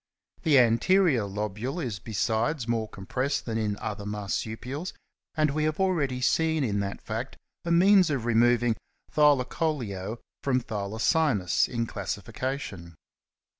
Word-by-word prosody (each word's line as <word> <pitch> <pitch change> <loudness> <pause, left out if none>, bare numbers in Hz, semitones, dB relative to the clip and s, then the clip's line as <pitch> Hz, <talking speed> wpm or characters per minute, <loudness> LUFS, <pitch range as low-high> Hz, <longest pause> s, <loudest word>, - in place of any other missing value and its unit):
The 150 -3 +4
anterior 125 - +4
lobule 105 - -3
is 115 - -3
besides 115 - -1
more 115 -2 -1
compressed 130 +9 -2
than 115 -1 -2
in 105 -2 -1
other 105 -1 -5
Marsupials, 110 - -4 0.4
and 155 -2 +2
we 155 +1 -1
have 155 +2 -1
already 150 -10 +1
seen 160 +3 +2
in 105 -5 0
that 100 0 -4
fact 115 +4 -4 0.3
a 170 - -1
means 185 +1 +6
of 135 -6 -1
removing 120 0 +3 0.4
Thylacoleo 130 - +1 0.2
from 130 -2 +2
Thylacinus 110 - +1
in 115 -2 -2
classi 100 -2 -4
fication. 95 - -5
120 Hz, 130 wpm, -27 LUFS, 105-150 Hz, 0.4 s, means